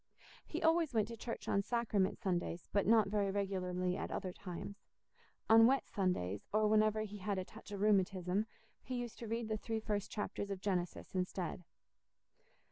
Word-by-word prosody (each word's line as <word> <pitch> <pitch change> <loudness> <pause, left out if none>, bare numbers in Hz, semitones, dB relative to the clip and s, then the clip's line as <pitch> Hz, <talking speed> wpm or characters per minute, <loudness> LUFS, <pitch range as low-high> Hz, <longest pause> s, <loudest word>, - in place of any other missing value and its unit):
He - - -3
always 325 -4 +3
went 215 -1 +2
to 230 - -5
church 230 +1 -6
on 200 - +3
Sacrament 210 -3 +1
Sundays, 175 -4 -2
but 200 -1 +2
not 220 -2 +6
very 200 -1 +1
regularly 185 -2 -1
at - - -3
other 185 -2 -3
times; 190 +2 -7 0.7
on 225 +1 +8
wet 270 +2 +2
Sundays, 105 - -1
or 215 0 +3
whenever 215 0 +4
he 210 -1 -5
had 195 +1 -1
a 185 - -2
touch 220 +1 -12
of 200 -1 -4
rheumatism, 195 -1 +2 0.3
he 255 - -5
used 245 -2 -4
to 230 - -6
read 230 +1 -2
the 215 0 -1
three 225 +1 -2
first 210 -2 -2
chapters 205 -1 -3
of 195 -2 -3
Genesis 180 -3 -2
instead. 180 -1 -2
205 Hz, 175 wpm, -36 LUFS, 185-220 Hz, 0.7 s, on